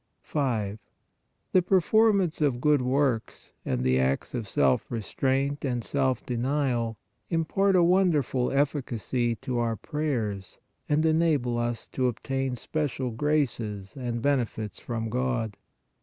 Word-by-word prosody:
5. 110 -8 -1 0.7
The 185 - +5
performance 195 -1 +3
of 135 -5 +2
good 150 +1 +3
works 130 -2 -1
and 65 0 -1
the 65 0 +3
acts 65 +1 0
of 120 -4 -3
self 65 -8 +2
restraint 135 +5 -1
and 125 -4 -1
self 130 -2 0
denial 125 -2 0 0.3
impart 190 +4 +2
a 180 - +5
wonderful 170 -8 +2
efficacy 125 -4 0
to 125 +2 -3
our 115 -1 0
prayers 110 -9 -3 0.3
and 150 +2 +2
enable 155 -7 +2
us 120 -1 -2
to 130 -1 0
obtain 135 +2 -2
special 135 -2 -2
graces 115 -7 -1
and 120 -3 -3
benefits 120 -6 -1
from 115 -2 -3
God. 120 -3 -1
130 Hz, 125 wpm, -27 LUFS, 115-150 Hz, 0.7 s, The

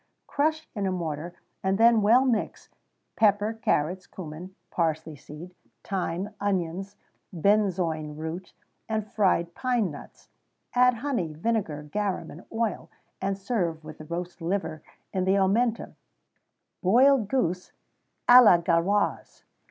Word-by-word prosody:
_ - - -53
Crush 315 +2 0
in 200 -2 -2
a - - 0
mortar, 170 -1 -4 0.3
and 190 0 +1
then 230 0 +5
well 235 +6 +5
mix, 235 -5 -1 0.5
pepper, 210 0 +3
carrots, 185 -4 -1
cummin, 180 +2 -9 0.2
parsley 160 -2 -1
seed, 150 +6 -11 0.3
thyme, 185 0 -3
onions, 195 0 -2 0.4
benzoin 175 -5 +1
root, 160 +4 -6 0.4
and 220 -1 -1
fried 185 -5 +1
pine 245 -7 0
nuts; 145 - -13 0.4
add 250 0 +4
honey, 230 - -2
vinegar, 165 -5 -2
garum, 195 +5 -3
and 165 - -11
oil, 225 -3 -2 0.3
and 195 0 -1
serve 185 -6 -2
with 155 0 -10
the 155 - -9
roast 170 +2 -6
liver 165 -3 -2 0.3
in 185 -2 0
the 190 +1 +2
omentum.[XVII 220 +5 +1 0.9
78] - - -54
_Boiled 245 +4 +5
Goose 180 -8 -1 0.6
à 245 +1 +10
la 195 -6 +7
Gauloise. 170 +4 0
190 Hz, 130 wpm, -26 LUFS, 170-220 Hz, 0.9 s, à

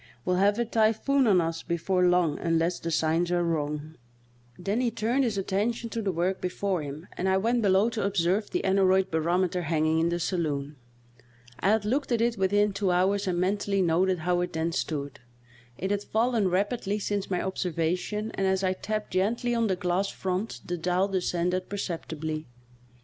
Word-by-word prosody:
We'll 180 0 +1
have 200 +2 +3
a 235 - +1
typhoon 230 +4 +2
on 195 -4 +5
us 165 -1 -1
before 180 +2 0
long 175 -4 +2
unless 165 +1 +1
the 165 - -4
signs 165 +2 +1
are 175 0 +2
wrong." 155 -1 -2 0.6
Then 200 +6 -1
he 245 - +2
turned 230 +4 0
his 225 -5 -1
attention 215 +5 -1
to 230 - -2
the 200 -3 0
work 180 +2 -1
before 185 0 -1
him 145 +3 -7
and 190 - 0
I 190 - +3
went 230 +4 +1
below 195 +1 +4
to 225 - -2
observe 195 +1 +1
the - - -2
aneroid 190 0 +3
barometer 175 +3 +1
hanging 160 -1 +1
in 165 +1 +2
the 175 0 -1
saloon. 150 -5 -2 0.8
I 195 - +2
had 215 0 +2
looked 265 +5 0
at 235 - +2
it 235 0 +1
within 205 +1 +2
two 195 -1 0
hours 190 +3 +2
and 180 -1 0
mentally 195 +1 +1
noted 180 +2 +2
how 175 +2 0
it 180 - -3
then 160 +1 -1
stood; 145 -5 -3 0.6
it 190 +2 -2
had 205 -1 0
fallen 225 -1 +1
rapidly 205 +2 0
since 205 -1 -2
my 180 - 0
observa 175 -3 -1
tion, 210 +4 -4
and 195 - -1
as 190 0 +1
I 185 0 +2
tapped 215 +3 -4
gently 225 +6 0
on 230 -1 +1
the 190 - +1
glass 180 +2 0
front 190 +4 -3
the 175 -1 -3
dial 180 +3 +1
descended 180 -1 -1
perceptibly. 160 -5 -4
185 Hz, 190 wpm, -27 LUFS, 170-205 Hz, 0.8 s, on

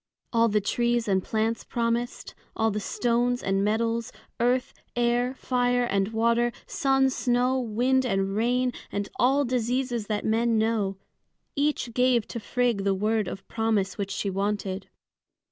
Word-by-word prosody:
All 230 0 +4
the 210 0 +2
trees 240 +2 0
and 190 -2 +2
plants 225 +1 -1
promised; 235 0 -2 0.2
all 225 0 +1
the 210 - -2
stones 245 +3 0
and 195 0 +1
metals; 230 +2 0 0.3
earth, 245 +2 +1 0.2
air, 240 +2 +1
fire, 245 -1 +1
and 200 -4 +1
water; 235 +2 +2
sun, 270 -3 +2
snow, 250 +1 +1
wind, 250 +3 +1
and 195 -4 0
rain, 245 +3 +1 0.2
and 200 0 -2
all 275 +3 +3
diseases 245 -2 -1
that 210 -1 -2
men 225 +1 +2
know, 215 -3 0 0.6
each 285 -5 0
gave 250 -2 +2
to 235 - -4
Frigg 240 -3 0
the 195 -1 +2
word 215 +1 0
of 195 - -7
promise 220 -4 0
which 200 -1 -2
she 200 0 -2
wanted. 195 0 -2
230 Hz, 145 wpm, -26 LUFS, 210-245 Hz, 0.6 s, All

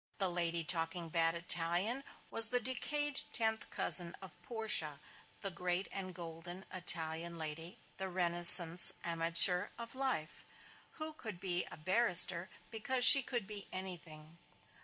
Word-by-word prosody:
The 190 -2 -5
lady 170 -1 -5
talking 165 +1 -3
bad 165 0 -1
Italian 175 +9 -4 0.3
was 225 0 +3
the 245 +2 -1
decayed 285 +4 -3
tenth 220 -1 -4
cousin 175 -1 +4
of 190 - -14
Portia, 215 -11 0 0.4
the 195 - -6
great 180 +1 -6
and 190 -1 -8
golden 175 +2 -12
Italian 170 -1 -5
lady, 160 +2 -7 0.2
the 190 0 -8
Renascence 175 -1 +6
amateur 170 +3 +1
of 235 0 -10
life, 260 -13 -6 0.5
who 315 0 -10
could 215 - -10
be 180 -1 -2
a - - -13
barrister 185 0 +1 0.2
because 250 +3 -1
she 275 - +9
could 240 -4 -7
be 205 -1 -9
anything. 170 -3 -10
180 Hz, 135 wpm, -31 LUFS, 170-220 Hz, 0.5 s, she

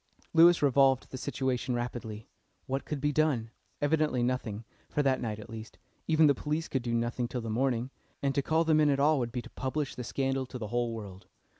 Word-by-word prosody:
Lewis 170 0 +7
revolved 135 -1 +4
the 130 - -5
situation 130 -2 -1
rapidly. 120 -3 -5 0.4
What 135 +1 -3
could 150 - -3
be 145 +2 +1
done? 140 -7 +1 0.3
Evidently 150 -4 +1
nothing 115 -3 -2 0.2
for 145 - 0
that 135 -2 +2
night 110 -3 -3
at 105 - -10
least. 110 0 -9 0.3
Even 160 -1 +5
the 145 - +6
police 150 +4 -2
could 135 - -1
do 120 -1 -1
nothing 120 +1 -1
till 125 0 -4
the 115 -1 -4
morning, 125 +1 0 0.3
and 140 -1 0
to 140 - +1
call 160 +4 +2
them 160 -1 +3
in 150 -1 +4
at 140 -1 +2
all 150 +1 +4
would 120 -2 -2
be 120 0 -4
to - - -11
publish 135 +2 -2
the 125 - -6
scandal 135 +1 -1
to 125 - -7
the 110 -4 -5
whole 120 0 0
world. 100 -4 -8
130 Hz, 215 wpm, -30 LUFS, 120-145 Hz, 0.4 s, Lewis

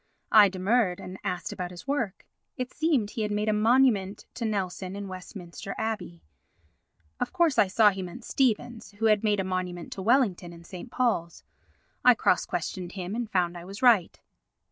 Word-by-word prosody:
I 210 -2 +8
demurred, 190 0 +1
and 185 +1 -8
asked 180 -3 -3
about 180 -1 -4
his 180 +7 -11
work. 240 -9 -2 0.3
It 255 0 -4
seemed 285 -11 +1
he 230 - -4
had 210 - -1
made 210 +1 -1
a - - +3
monument 215 -3 +2
to 235 - -4
Nelson 190 -3 -3
in 200 0 -5
Westminster 185 0 -8
Abbey. 200 - -4 1.0
Of - - -2
course 340 -6 +2
I 200 - +5
saw 210 +2 +5
he 195 0 -5
meant 185 +7 -8
Stevens, 240 -3 -1
who 215 +2 -3
had 215 -1 +4
made 210 -2 +2
a - - +1
monument 185 -2 -4
to 195 - -6
Wellington 200 -6 +2
in 170 0 -13
St. 180 +6 -9
Paul's. 220 -10 -1 0.6
I 250 -1 +7
cross 185 - +2
questioned 180 +1 -4
him 185 0 -5
and 235 -1 -3
found 180 -3 0
I 170 - -8
was 195 +6 -9
right. 225 -9 +4
200 Hz, 185 wpm, -27 LUFS, 180-230 Hz, 1.0 s, I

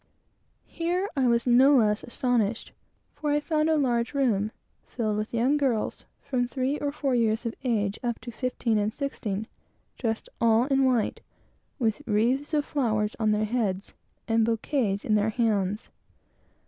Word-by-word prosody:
Here 355 +4 -1
I 265 -3 +2
was 235 0 +2
no 260 +3 +6
less 210 -3 +2
astonished; 235 -3 -1 0.4
for 300 - -3
I 295 - +3
found 305 +1 0
a 320 - +3
large 240 -2 0
room, 220 -6 +1 0.4
filled 215 -4 -2
with 215 +1 -3
young 250 +5 +2
girls, 260 -7 -1 0.2
from 250 -3 -1
three 265 +3 -1
or 290 -1 -1
four 280 -2 -1
years 230 -1 +1
of 230 - -2
age 210 -5 0
up 240 -3 -2
to 240 - -7
fifteen 235 -2 -1
and 210 +1 0
sixteen, 220 -6 -3 0.5
dressed 225 -2 -2
all 230 +1 +4
in 270 -1 +2
white, 245 -4 +1 0.6
with 230 -1 0
wreaths 240 +7 +1
of 295 -1 +1
flowers 215 -6 0
on 220 -1 +2
their 215 0 +2
heads, 210 -4 -2 0.3
and 225 -1 +3
bouquets 225 -2 0
in 215 - +1
their 210 +1 +3
hands. 210 -3 0
235 Hz, 160 wpm, -27 LUFS, 215-270 Hz, 0.6 s, no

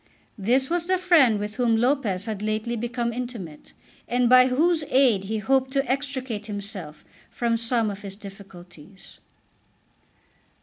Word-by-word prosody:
This 250 +7 +2
was 340 +2 -2
the 370 0 +2
friend 330 - +4
with 210 +1 -5
whom 235 -3 +2
Lopez 230 -6 0
had 215 -3 -4
lately 215 +2 -2
become 235 +1 -3
intimate, 225 -11 -7 0.3
and 245 0 +1
by 255 +1 +7
whose 315 +5 +2
aid 245 -8 +3
he 220 +2 -2
hoped 265 +4 +1
to 275 0 0
extricate 260 -5 -3
himself 200 -7 -7 0.2
from 235 -1 -1
some 230 -1 0
of 200 0 -9
his 195 -1 -8
difficulties. 190 -3 -14
230 Hz, 140 wpm, -24 LUFS, 205-260 Hz, 0.3 s, by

